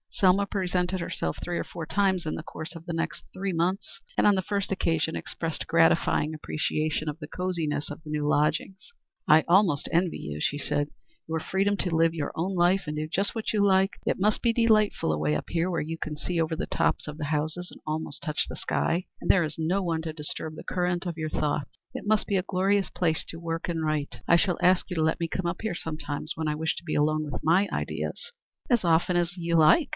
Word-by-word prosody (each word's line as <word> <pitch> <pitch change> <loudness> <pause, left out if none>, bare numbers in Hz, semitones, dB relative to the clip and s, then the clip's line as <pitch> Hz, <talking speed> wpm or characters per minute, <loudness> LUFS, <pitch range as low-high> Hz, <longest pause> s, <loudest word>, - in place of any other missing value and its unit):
Selma 195 +1 +3
presented 185 -2 -1
herself 80 - -3
three 175 -1 -2
or - - -1
four 165 - -7
times 190 -1 +1
in 155 - -2
the - - -6
course 160 +1 -8
of 165 0 -10
the 170 - -4
next 165 0 -3
three 195 0 -2
months, 185 +3 -1 0.2
and - - +5
on 205 - +6
the 190 - +1
first 200 +1 -2
occasion 165 -4 0
expressed 165 -1 -4
gratifying 165 -2 +3
appreciation 155 0 -1
of 150 0 -2
the 150 - -7
cosiness 165 -5 -2
of 150 +2 -8
the 155 - -10
new 150 -1 -1
lodgings. 155 - 0 0.4
"I 155 +1 +7
almost 175 -5 +4
envy 175 +1 +2
you," 75 0 -6
she 145 - 0
said, 145 0 0 0.4
"your 160 0 -1
freedom 195 +4 +1
to 180 -4 -1
live 165 0 +4
your 150 -3 -2
own 185 +4 -1
life 180 +2 +3
and 150 0 -3
do 155 0 -2
just 195 +5 0
what 225 -1 -2
you 210 -2 +3
like. 190 0 +4
It - - 0
must 210 +2 +2
be 235 - +3
delightful 215 - +3
away 75 0 +1
up 75 - -4
here 170 +2 0
where 170 - 0
you 165 +2 -4
can 155 -2 -4
see 165 +3 -1
over 160 0 0
the - - -2
tops - - 0
of 150 0 -6
the 150 - -3
houses 155 +4 -2
and - - -13
almost 155 -1 -3
touch 155 -2 -1
the - - -6
sky, 175 +3 0 0.2
and - - -5
there 185 - +6
is 155 -1 -4
no 175 +5 +1
one 165 -2 0
to 160 -1 -4
disturb 155 0 -5
the - - -8
current 180 0 -1
of 170 -2 -3
your 155 -1 -2
thoughts. 150 -2 -1 0.2
It - - -6
must 215 -1 +2
be 200 - +1
a 185 - +2
glorious 195 +1 +1
place 160 -3 0
to 165 - -6
work 165 +1 -3
and 165 -2 -1
write. 150 -9 -2
I 170 - +6
shall 175 0 +2
ask 185 +1 +4
you 180 - -3
to 160 - +1
let 160 +2 +1
me 170 - 0
come 185 - -2
up 170 +1 -2
here 220 -5 -2
sometimes 155 -3 -4
when 160 0 -2
I 150 - 0
wish 160 +1 -1
to - - -7
be 165 - -3
alone 155 +1 +2
with 150 - -5
my 180 +6 +4
own - - -10
ideas." 475 0 -4 0.4
"As 240 -5 +3
often 170 +1 +3
as 175 +1 0
you 170 -1 0
like. 165 - +6
165 Hz, 240 wpm, -27 LUFS, 155-185 Hz, 0.4 s, I